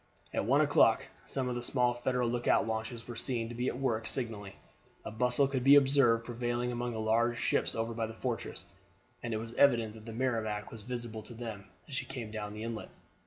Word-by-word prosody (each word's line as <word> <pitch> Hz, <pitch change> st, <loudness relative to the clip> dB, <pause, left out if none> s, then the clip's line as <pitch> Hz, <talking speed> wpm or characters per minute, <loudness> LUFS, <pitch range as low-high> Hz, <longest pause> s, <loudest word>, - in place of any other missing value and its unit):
At -, -, 0 dB
one -, -, +4 dB
o'clock -, -, +4 dB, 0.2 s
some 130 Hz, -2 st, -2 dB
of 125 Hz, -, -1 dB
the 120 Hz, -, -3 dB
small 125 Hz, 0 st, +2 dB
Federal 125 Hz, 0 st, 0 dB
lookout 120 Hz, -1 st, +2 dB
launches 110 Hz, +1 st, -4 dB
were 120 Hz, -, -6 dB
seen 115 Hz, -2 st, -2 dB
to -, -, -6 dB
be 120 Hz, +2 st, -2 dB
at -, -, -1 dB
work 115 Hz, -5 st, 0 dB
signaling, 110 Hz, -4 st, -3 dB, 0.5 s
a -, -, -4 dB
bustle 125 Hz, +4 st, +2 dB
could 135 Hz, -2 st, -1 dB
be 140 Hz, +2 st, +8 dB
observed 135 Hz, -5 st, +5 dB
prevailing 120 Hz, 0 st, -1 dB
among 120 Hz, 0 st, -2 dB
the 110 Hz, -, -4 dB
large 115 Hz, +2 st, +2 dB
ships -, -, +1 dB
over 115 Hz, +1 st, -1 dB
by 115 Hz, -1 st, -1 dB
the 110 Hz, -, -8 dB
fortress, 120 Hz, 0 st, -4 dB, 0.6 s
and 120 Hz, -, -4 dB
it 110 Hz, -, 0 dB
was 115 Hz, +1 st, -6 dB
evident 120 Hz, -5 st, +4 dB
that 110 Hz, -1 st, -12 dB
the 115 Hz, -, -6 dB
Merrimac 110 Hz, -3 st, -1 dB
was 115 Hz, -, -8 dB
visible 120 Hz, -1 st, -5 dB
to 120 Hz, -, -9 dB
them 110 Hz, -4 st, -6 dB, 0.2 s
as 145 Hz, -, -10 dB
she 130 Hz, -, -1 dB
came 120 Hz, -5 st, -6 dB
down 105 Hz, -1 st, -5 dB
the 105 Hz, -, -5 dB
inlet. 115 Hz, -1 st, -5 dB
120 Hz, 215 wpm, -32 LUFS, 110-125 Hz, 0.6 s, be